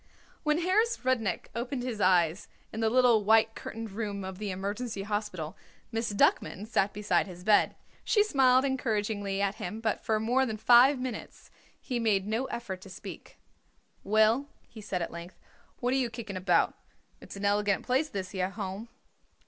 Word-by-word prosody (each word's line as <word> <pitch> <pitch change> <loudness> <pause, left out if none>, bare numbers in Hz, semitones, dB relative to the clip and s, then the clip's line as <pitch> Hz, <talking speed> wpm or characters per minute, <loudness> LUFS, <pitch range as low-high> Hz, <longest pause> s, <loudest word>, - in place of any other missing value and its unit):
When 300 -1 +1
Harris 430 +6 +2
Rudnik 225 -8 0
opened 245 +2 -3
his 235 -5 -4
eyes 180 -1 +3 0.3
in 220 - -4
the 225 -1 +2
little 240 -3 +4
white 220 +1 +4
curtained 225 -1 -7
room 200 -1 -4
of 190 0 -7
the 210 -1 -3
Emergency 200 +3 -4
Hospital, 200 -5 -3 0.4
Miss 225 -1 -1
Duckman 205 0 +1
sat 205 -2 +1
beside 210 0 0
his 180 -1 -10
bed. 210 +1 +4 0.3
She 415 - +3
smiled 265 -8 +4
encouragingly 210 -6 -1
at 200 0 -1
him, 195 +5 -4
but 225 -1 -1
for 220 -1 +1
more 245 +5 +2
than 220 -4 -2
five 245 +5 +6
minutes 250 -2 -7 0.3
he 245 -2 -3
made 205 -4 +1
no 220 +5 -1
effort 220 -8 -5
to 195 - -12
speak. 180 - -10 0.7
"Well," 220 +6 +3 0.2
he 225 - -12
said 185 -4 -2
at - - -5
length, 170 +2 -9 0.4
"what 250 +1 +1
are - - +2
you 255 -3 0
kicking 225 -3 -7
about? 180 -2 +2 0.5
It's - - -10
an 200 +1 -4
elegant 205 -1 +1
place, 265 +5 +1
this 190 -5 -5
here 185 -2 -1
Home." 200 +2 -6
215 Hz, 175 wpm, -29 LUFS, 195-245 Hz, 0.7 s, five